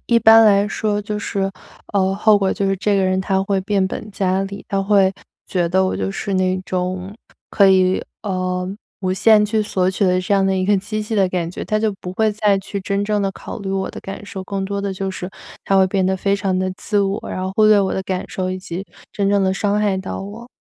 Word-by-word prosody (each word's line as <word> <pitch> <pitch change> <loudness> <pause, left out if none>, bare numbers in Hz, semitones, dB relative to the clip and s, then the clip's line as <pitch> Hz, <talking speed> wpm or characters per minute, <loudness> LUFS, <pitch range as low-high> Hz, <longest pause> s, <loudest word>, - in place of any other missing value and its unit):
一 235 - +4
般 225 0 +7
来 200 -1 +5
说 210 -1 -1
就 210 0 -4
是， 195 -1 -1 0.4
呃， 190 -1 +2
后 210 +1 +5
果 195 -1 +1
就 200 - -1
是 195 0 +1
这 200 +2 +1
个 195 - +2
人 185 0 +1
他 190 0 0
会 195 0 0
变 195 0 +1
本 210 +2 -6
加 190 -1 0
厉， 200 +1 -7
他 195 -1 0
会 195 -1 +3 0.3
觉 175 -2 0
得 190 +2 +2
我 - - -2
就 95 0 -2
是 195 - -3
那 185 0 +1
种 185 +1 -3 0.3
可 200 -2 +4
以， 185 -1 +3 0.2
呃， 185 -3 -2 0.3
无 185 -1 0
限 210 +2 +5
去 215 0 0
索 185 -3 0
取 190 +2 0
的 185 -1 +2
这 190 +2 0
样 195 - +3
的 195 0 +1
一 185 - 0
个 205 0 +4
机 215 +3 -4
器 215 +1 -4
的 195 -3 +3
感 175 -2 -2
觉， 175 - -6
他 215 0 0
就 220 -1 0
不 180 - -6
会 220 +2 +1
再 205 -1 +2
去 195 +1 -5
真 200 +1 -1
正 210 0 0
地 195 - 0
考 205 - -8
虑 195 -1 -4
我 195 0 -1
的 - - -8
感 195 +1 -8
受， 195 -3 -6
更 195 0 -3
多 200 +1 -3
的 200 -1 -2
就 195 +1 -3
是 180 0 -6 0.3
他 195 - +2
会 190 -1 +5
变 190 0 0
得 190 +1 +1
非 200 +1 +1
常 190 -2 -1
地 185 0 0
自 205 +1 -1
我， 200 +1 0
然 - - -4
后 190 - -3
忽 215 +1 +4
略 215 -1 +6
我 190 - 0
的 190 - -2
感 185 -1 -3
受 185 -1 -3
以 185 - -3
及 185 0 -6 0.3
真 200 -1 0
正 200 -1 +3
地 190 0 +1
伤 205 +1 0
害 205 -2 +1
到 190 0 -5
我。 210 +5 -9
195 Hz, 275 characters per minute, -20 LUFS, 185-205 Hz, 0.4 s, 般